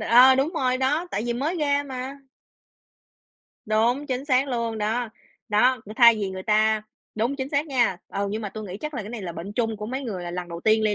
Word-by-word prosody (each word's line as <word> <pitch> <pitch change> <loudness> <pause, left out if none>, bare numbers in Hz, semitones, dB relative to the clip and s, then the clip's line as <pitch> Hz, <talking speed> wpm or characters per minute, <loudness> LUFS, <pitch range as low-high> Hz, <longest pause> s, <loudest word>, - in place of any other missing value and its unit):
ờ, 245 +4 +7
đúng 270 +5 +1
rồi 255 -5 +1
đó, 290 +7 0
tại 210 - -2
vì 240 - 0
mới 290 +9 -1
ra 285 -2 +1
mà. 260 0 -6 1.5
Đúng, 235 +7 +1
chính 260 +1 -2
xác 270 -1 +2
luôn, 230 -3 -2
đó, 225 +3 -1 0.4
đó, 240 +4 +3
cũng 215 - -9
thay 235 -1 +8
vì 200 -3 -2
người 185 0 -6
ta 215 0 +2 0.3
đúng 235 +6 -1
chính 265 -1 -3
xác 285 +2 0
nha. 245 - +2
Ừ, 200 0 -2
nhưng 215 +2 -3
mà 205 - -3
tui 215 +2 -7
nghĩ 190 -2 -6
chắc 300 0 -5
là 240 - -3
cái 205 - -8
này 235 -3 -6
là 175 -2 -5
bệnh 170 +5 -7
chung 225 0 -1
của 210 0 -6
mấy 260 +4 -4
người 205 -8 -4
là 175 - -5
lần 175 0 -5
đầu 170 0 -7
tiên 220 +2 +3
đi 210 - +2
235 Hz, 240 wpm, -25 LUFS, 210-265 Hz, 1.5 s, thay